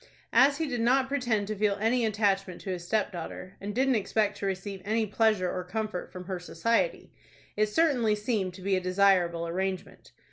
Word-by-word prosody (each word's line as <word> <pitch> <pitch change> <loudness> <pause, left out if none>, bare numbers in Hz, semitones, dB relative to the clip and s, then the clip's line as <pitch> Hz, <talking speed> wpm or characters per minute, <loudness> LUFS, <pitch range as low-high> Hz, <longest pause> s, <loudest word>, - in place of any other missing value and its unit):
As 275 +4 +5
he 325 - -1
did 245 -5 -2
not 260 +3 +3
pretend 240 -7 0
to 215 +1 -4
feel 205 0 +1
any 230 +2 +2
attachment 195 -3 0
to 190 - -4
his 180 -2 -4
stepdaughter, 185 -3 -3
and 205 +1 -5
didn't 265 +1 +3
expect 210 -1 0
to 200 - -2
receive 195 0 -4
any 220 +2 0
pleasure 210 -3 +1
or 180 - -3
comfort 210 0 -4
from 180 - -8
her 185 -1 -4
society, 230 - -1 0.4
it 215 0 +2
certainly 245 -5 +2
seemed 210 -4 -2
to 185 - -11
be 195 0 +2
a 185 - 0
desirable 180 -3 +2
arrangement. 185 +2 -4
205 Hz, 185 wpm, -28 LUFS, 185-230 Hz, 0.4 s, As